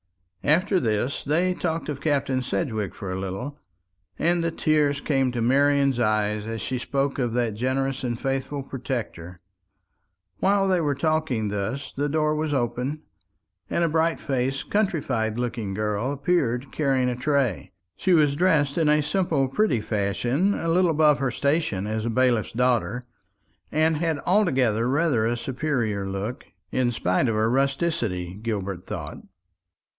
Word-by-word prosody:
After 185 +6 +3
this 115 +2 -1
they 170 +6 +1
talked 165 -2 -2
of 145 -2 -4
Captain 135 -4 +1
Sedgewick 110 - -2
for 95 -2 -5
a 95 - -3
little, 110 +10 -5 0.6
and 170 +1 +1
the 165 - +1
tears 150 -3 +1
came 135 -3 +1
to 120 -1 -2
Marian's 140 +1 +3
eyes 105 -1 +1
as 115 0 -4
she 130 -1 -2
spoke 140 +2 -1
of 120 -3 0
that 120 -3 0
generous 130 +4 -1
and 120 -2 -2
faithful 135 +1 -2
protector. 120 -10 -5 1.0
While 195 0 +3
they 185 -2 +2
were 145 -3 0
talking 140 -7 0
thus, 105 +7 -3
the 145 +2 0
door 155 0 +1
was 155 0 -1
opened, 135 +3 -1 0.7
and 170 - +1
a - - +3
bright 165 +1 +1
faced 135 0 -2
countrified 135 - 0
looking 115 -5 -3
girl 105 +4 -1
appeared 140 -4 0
carrying 135 -4 +1
a 125 - 0
tray. 130 - 0 0.2
She 185 - +1
was 150 -4 +4
dressed 150 -3 +2
in 155 -2 +3
a 150 0 +4
simple 150 -5 +1
pretty 135 - +1
fashion, 110 - 0
a 165 - -3
little 175 +2 +3
above 150 -2 +4
her 135 - +1
station 140 - 0
as 110 +1 -2
a - - 0
bailiff's 120 -2 +1
daughter, 125 0 +1 0.7
and 155 0 +2
had 160 -1 0
altogether 130 - +2
rather 140 -6 +2
a 120 +1 0
superior 120 -6 -2
look, 100 +6 -4 0.3
in 125 -1 +1
spite 95 +2 +1
of 115 - 0
her 110 +1 +2
rusticity, 135 - 0
Gilbert 100 -5 -3
thought. - - -6
135 Hz, 155 wpm, -25 LUFS, 115-155 Hz, 1.0 s, was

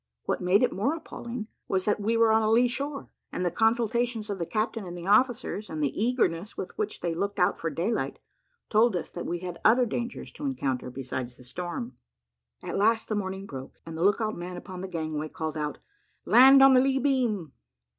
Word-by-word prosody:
What - - -2
made 185 +5 +4
it 250 - +2
more 250 +11 0
appalling 240 -7 -6 0.2
was, 190 -1 0
that 210 - +1
we 225 +3 +1
were 230 -1 +5
on 220 0 +4
a 215 - +1
lee 240 +3 +5
shore, 280 +3 -4 0.2
and 180 - -2
the 175 - +1
consultations 230 0 +1
of 195 - -4
the 170 - -2
captain 220 0 -1
and 175 0 -7
officers, 240 -1 +2
and 155 -1 -3
the 140 - 0
eagerness 215 -6 0
with 185 - -6
which 425 -1 -3
they 170 -1 -1
looked 200 +4 -2
out 180 -2 +3
for 165 - -3
daylight, 175 +9 -2 0.5
told 220 -1 +3
us 175 - -3
that 175 - -6
we 175 0 -3
had 180 -2 -6
other 245 +3 +5
dangers 235 +1 -4
to 295 - -7
encounter 135 - -2
besides 125 -1 -5
the - - -15
storm. 180 - -6 0.7
At - - -3
last 225 +2 +2
the 215 - 0
morning 195 -1 -3
broke, 135 -7 -9
and 165 -1 -7
the 160 - -5
look 205 +3 +4
out 215 -1 -1
man 175 +1 -6
upon 180 0 -8
the 190 - -4
gangway 155 -3 -3
called 160 0 -4
out, 150 -1 -3 0.5
"Land 270 +2 +8
on 270 0 +8
the 255 - +6
lee 270 0 +2
beam!" 240 - 0
205 Hz, 210 wpm, -27 LUFS, 175-240 Hz, 0.7 s, Land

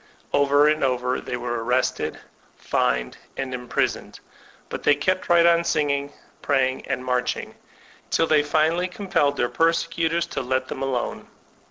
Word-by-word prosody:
Over 145 +1 +4
and 155 0 +2
over 125 -1 0
they 125 - -4
were 120 -1 -3
arrested, 125 +2 0 0.4
fined, 60 0 -1 0.2
and 135 -1 -3
imprisoned; 125 -1 -2 0.5
but - - -6
they 145 - +4
kept 185 +6 -1
right 170 -1 +6
on 170 0 +5
tioging, 145 -4 0 0.3
praying, 130 -2 0
and 130 -1 -3
marching, 125 -1 -1 0.6
till 165 - +2
they 155 -2 +4
finally 160 +4 +1
com 190 +2 -9
pelled 145 -5 +2
their 120 - +1
persecutors 165 +1 +1
to - - -1
let 130 0 -1
them 130 - -5
alone. 130 -3 -3
140 Hz, 150 wpm, -23 LUFS, 130-165 Hz, 0.6 s, right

